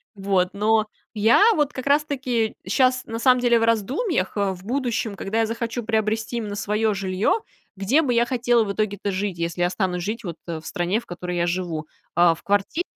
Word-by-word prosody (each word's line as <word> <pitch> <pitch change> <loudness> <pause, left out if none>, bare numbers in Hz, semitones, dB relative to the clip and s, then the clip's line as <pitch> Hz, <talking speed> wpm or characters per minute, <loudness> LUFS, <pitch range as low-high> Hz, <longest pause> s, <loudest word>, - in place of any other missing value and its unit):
Вот. 195 -2 +1
Но 215 +1 +2 0.3
я 220 - +4
вот 295 -2 +1
как 260 +1 -5
раз 290 +1 +4
таки 250 -6 -1
щас 255 -1 +2
на 225 0 -5
самом 250 +1 +4
деле 240 -1 +4
в - - 0
раздумьях, 230 - 0
э, 200 -1 +1
в 180 0 -12
будущем, 240 -3 -1
когда 195 +3 -2
я 225 - +3
захочу 230 +1 -3
приобрести 220 +1 -1
именно 210 -3 -4
свое 210 +2 0
жилье, 195 - 0 0.4
где 215 +11 +3
бы 265 -6 0
я 235 0 +3
хотела 240 -2 +2
в 200 - -3
итоге-то 205 -1 -2
жить, 190 -1 -2
если 170 +1 -2
останусь 180 -1 -1
жить 225 +5 -4
вот 170 -5 -5
в 165 -2 -4
стране, 175 +6 -1
в 235 - -14
которой 180 0 -5
я 170 0 +1
живу. 175 -3 -3 0.3
А, 175 -1 +5
в - - -18
квартире 205 - 0
215 Hz, 200 wpm, -23 LUFS, 190-240 Hz, 0.4 s, А